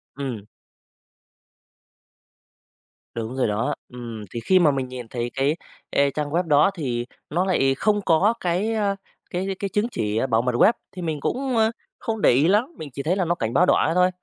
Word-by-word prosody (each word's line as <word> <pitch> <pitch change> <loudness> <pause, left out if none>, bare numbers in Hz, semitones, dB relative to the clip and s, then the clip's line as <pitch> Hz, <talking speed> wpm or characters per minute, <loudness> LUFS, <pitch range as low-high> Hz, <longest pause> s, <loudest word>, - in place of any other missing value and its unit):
Ừm. 130 -7 -5 2.7
Đúng 115 +2 -4
rồi 130 - +2
đó, 105 +3 0 0.2
ừm, 115 -3 -7
thì 120 - -3
khi 185 +10 +4
mà 160 -4 +5
mình 135 -2 -2
nhìn 125 -2 -7
thấy 120 +1 -4
cái, 140 +4 +1 0.3
ê, 140 0 +3
trang 150 0 -3
web 170 +4 +1
đó 150 +4 +4
thì 125 -8 -2 0.2
nó 175 +4 +1
lại 135 -8 +2
không 205 +7 +1
có 190 +6 +4
cái, 185 +6 0
a, 205 -2 +1 0.3
cái 180 +2 -2
cái 200 - -2
chứng 210 +4 0
chỉ 105 - -1
bảo 115 -1 +3
mật 125 +1 0
web, 225 - +6 0.2
thì 180 - -8
mình 160 -3 -2
cũng, 260 - -1
a, 220 0 +4 0.3
không 220 -2 -3
để - - +6
ý 140 +6 +4
lắm, 220 - +2
mình 155 - -7
chỉ 140 - -5
thấy 170 +5 +1
là 190 -2 0
nó 170 +1 +1
cảnh 115 -6 -3
báo 180 - +5
đỏ - - +4
thế 165 - +1
thôi. 180 0 +5
155 Hz, 200 wpm, -23 LUFS, 125-190 Hz, 2.7 s, web